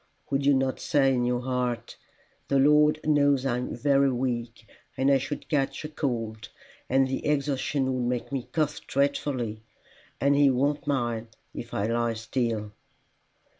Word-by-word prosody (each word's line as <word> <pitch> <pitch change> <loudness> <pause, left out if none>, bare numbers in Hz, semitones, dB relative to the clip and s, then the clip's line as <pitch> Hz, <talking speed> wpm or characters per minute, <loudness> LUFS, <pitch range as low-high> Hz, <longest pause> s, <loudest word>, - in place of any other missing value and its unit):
"Would 140 0 +1
you 145 - +6
not 130 0 0
say 135 -2 +2
in 125 -1 +1
your 125 0 0
heart, 125 -2 -2 0.5
'The 140 - +2
Lord 150 +2 +5
knows 145 -3 +3
I 125 -2 +1
am 125 - -4
very 140 +2 +3
weak, 120 -2 -3 0.3
and 135 +1 +3
I 135 - +4
should 145 +3 -5
catch 145 0 -1
cold, 115 -6 -3 0.4
and 135 +1 +3
the 130 - -3
exertion 140 -2 0
would 125 -1 -1
make 125 +1 -3
me 135 -3 -4
cough 155 -2 -1
dreadfully, 135 -5 -1 0.6
and 140 +1 +3
he 140 -1 +5
won't 145 +3 0
mind 120 -5 -1 0.3
if 115 - -7
I 100 - -1
lie 115 0 0
still? 115 -2 -2
130 Hz, 155 wpm, -27 LUFS, 120-140 Hz, 0.6 s, you